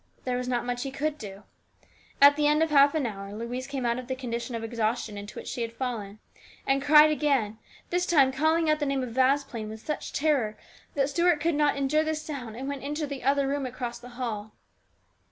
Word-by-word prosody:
There 250 -1 0
was 250 0 -3
not 245 -1 -1
much 245 0 -2
he 275 - -3
could 295 +3 -3
do. 200 -2 -9 0.8
At 285 +1 +8
the 295 0 +2
end 300 +2 +4
of 320 - -1
half 285 +1 +6
an 300 -4 +1
hour 195 -3 -5
Louise 245 +3 -5
came 270 -3 -3
out 235 +1 +1
of 250 - -8
the 260 - -2
condition 240 -1 -4
of 225 - -4
exhaustion 225 -1 -2
into 205 +1 -8
which - - -7
she 250 - -4
had 230 -1 -2
fallen, 230 -5 -4 0.5
and 275 0 +2
cried 300 +2 +7
again, 270 -8 0 0.3
this 355 +1 +1
time 275 -6 +5
calling 315 +4 +2
out 305 0 +3
the 295 - -1
name 275 -1 0
of 250 - -5
Vasplaine 260 -4 +1
with 220 0 -10
such 300 - -4
terror 270 -8 +1 0.4
that 280 0 +1
Stuart 340 +1 +3
could 330 +3 +1
net 295 -1 +2
endure 280 +3 +2
the 315 0 -1
sound 280 -8 -6
and 265 +2 -5
went 280 -1 -4
into 295 +2 -3
the 280 -2 -6
other 275 +1 +2
room 275 -1 -1
across 245 -1 -5
the 245 +1 -11
hall. 215 -4 -4
270 Hz, 225 wpm, -27 LUFS, 235-295 Hz, 0.8 s, At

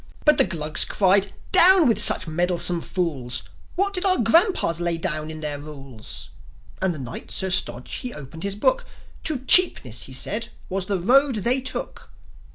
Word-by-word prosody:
But 300 -1 +4
the 270 - +5
Glugs 155 -2 0
cried, 195 0 +1 0.2
"Down 365 -3 +7
with 230 - +2
such - - +5
meddlesome 175 +1 0
fools! 135 -11 -3 0.3
What 395 +2 -1
did 365 -1 0
our 375 -2 +4
grandpas 235 - +2
lay 170 -1 -1
down 155 -2 -3
in 155 0 -9
their 150 -2 -4
rules?" 135 -7 -9 0.5
And 190 -1 0
the 165 - -7
Knight, 125 -3 -9
Sir 190 -1 -2
Stodge, 125 -8 -2
he 250 - -5
opened 150 - -10
his 200 +1 -4
Book: - - 0 0.4
"To 275 -5 -2
Cheapness," 135 - +3
he 130 - -11
said, 210 - 0 0.2
"was 185 0 -3
the 195 -2 -1
road 265 +7 +2
they 240 +5 +1
took." 260 - -6
185 Hz, 170 wpm, -22 LUFS, 155-255 Hz, 0.5 s, Down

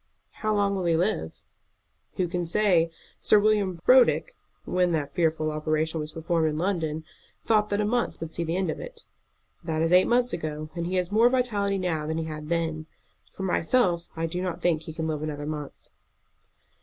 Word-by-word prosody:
"How 215 -1 +1
long 200 -1 +2
will 185 -2 -2
he 170 -1 +3
live?" 165 - -1 0.7
"Who 185 - 0
can 175 0 -3
say? 175 -3 +3 0.3
Sir 215 - +5
William 205 -4 +2
Brodrick, 260 - +5 0.3
when 180 -1 +1
that 145 -3 -2
fearful 160 -2 +1
operation 155 +1 -1
was 150 0 -5
performed 165 0 0
in 150 - -3
London, 160 -3 -1 0.4
thought 210 -1 +3
that 205 - 0
a 210 - +1
month 240 +3 -1
would 165 -1 -6
see 170 - -1
the 165 +2 -1
end 190 -1 0
of - - -6
it. - - -10 0.6
That 160 -1 -1
is 165 +2 +2
eight 180 +1 +6
months 245 0 +2
ago, 155 -2 -4
and 170 0 -3
he 185 - -2
has 180 0 0
more 225 +3 +5
vitality 210 -6 0
now 165 -5 -2
than 160 0 -2
he 165 - -2
had 155 -1 -7
then. 160 -2 -1 0.4
For 195 - -7
myself, 175 -1 +1
I 165 0 -1
do 175 +2 -3
not 185 -2 -3
think 170 -3 +2
that - - -14
he 160 - -7
can 160 0 -3
live 155 -2 -2
another 145 -1 -4
month." 150 -2 -6
170 Hz, 200 wpm, -26 LUFS, 160-200 Hz, 0.7 s, eight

